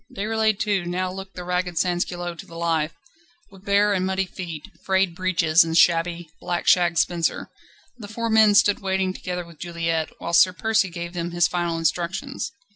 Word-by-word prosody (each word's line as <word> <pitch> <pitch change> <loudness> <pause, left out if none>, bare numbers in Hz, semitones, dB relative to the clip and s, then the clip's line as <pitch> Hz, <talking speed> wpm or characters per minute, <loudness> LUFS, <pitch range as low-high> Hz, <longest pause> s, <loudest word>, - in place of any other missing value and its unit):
Déroulède 220 +1 0
too 205 -4 0
now 180 +1 -2
looked 190 +1 -9
the 180 - -6
ragged 180 0 -2
sansculotte 175 0 -2
to - - -9
the 165 - -13
life, 165 -2 -1 0.6
with 195 -1 -16
bare 205 +1 +3
and 185 -2 0
muddy 190 0 0
feet, 170 -3 -8 0.2
frayed 190 -2 +1
breeches, 170 -3 +3
and 165 0 -1
shabby, 170 0 +3
black 175 -1 -3
shag 175 -2 +4
spencer. 170 0 0 0.5
The 210 - -8
four 230 +2 -3
men 220 -2 +5
stood 205 0 +4
waiting 190 -1 -1
together 180 -2 -5
with 170 -2 -16
Juliette, 165 -2 -2
whilst 170 0 +4
Sir 185 - +4
Percy 220 0 +1
gave 170 0 -6
them 170 -1 -3
his 175 -2 +2
final 175 -1 -2
instructions. 180 - -2
180 Hz, 180 wpm, -23 LUFS, 170-195 Hz, 0.6 s, men